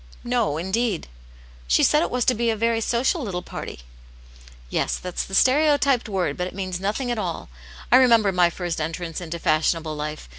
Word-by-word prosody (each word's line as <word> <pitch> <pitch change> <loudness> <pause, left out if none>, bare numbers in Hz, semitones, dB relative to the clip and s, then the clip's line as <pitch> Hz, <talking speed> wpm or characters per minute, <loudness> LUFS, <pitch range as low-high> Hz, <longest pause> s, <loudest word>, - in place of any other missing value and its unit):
" - - -23 0.2
No, 200 -10 0
indeed." 190 +3 -1 0.3
" - - -23 0.2
She 60 - +3
said 300 - +4
it - - 0
was 250 -1 0
to 255 - +4
be 235 0 0
a 225 - +1
very 230 +1 0
social 250 - +1
little 185 -7 -4
party.*' - - -8 0.9
"Yes, - - 0
that's 180 -1 -4
the 190 - -5
stereotyped 275 -1 +3
word, 180 -7 -1
but 180 - -2
it - - -10
means 185 -2 -4
nothing 215 +6 -2
at 235 - -2
all. 175 - -4 0.4
I 250 - +8
remember 230 -6 +5
my 180 -2 +3
first 175 -2 -4
entrance 165 +1 -4
into. 170 -1 -5
fashionable 160 0 0
life. 150 - -5
190 Hz, 195 wpm, -23 LUFS, 170-235 Hz, 0.9 s, I